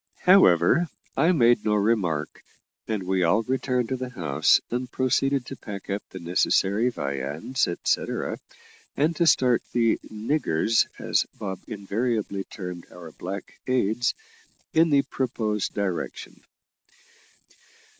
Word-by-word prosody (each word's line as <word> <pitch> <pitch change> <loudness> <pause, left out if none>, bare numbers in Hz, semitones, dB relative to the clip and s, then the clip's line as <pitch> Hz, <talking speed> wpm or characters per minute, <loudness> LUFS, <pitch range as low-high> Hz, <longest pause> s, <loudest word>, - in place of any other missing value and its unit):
However, 175 - +5 0.3
I 160 +6 +4
made 120 -8 +4
no 105 -1 +2
remark, 100 -8 0 0.5
and 110 -4 -2
we 95 0 0
all 100 +6 +3
returned 125 -1 -1
to 130 - 0
the 130 0 -5
house, 80 - +2
and 125 +1 -3
proceeded 135 +1 +1
to 135 - -7
pack 100 -4 -8
up 100 +1 -1
the - - -9
necessary 95 +6 +2
viands, 70 - -2
etcetera, 85 - -1 0.6
and 155 +4 +2
to 170 - +3
start 125 -5 +4
the 115 -2 +2
"niggers," 110 - +1
as - - 0
Bob 95 -2 -5
invariably 105 -1 -2
termed 90 -3 -8
our 85 -2 -11
black 95 +5 -7
aids, 120 -2 +1 0.6
in 165 +1 +4
the 140 -2 +4
proposed 115 -6 -2
direction. 95 -4 -4
110 Hz, 125 wpm, -25 LUFS, 95-130 Hz, 0.6 s, However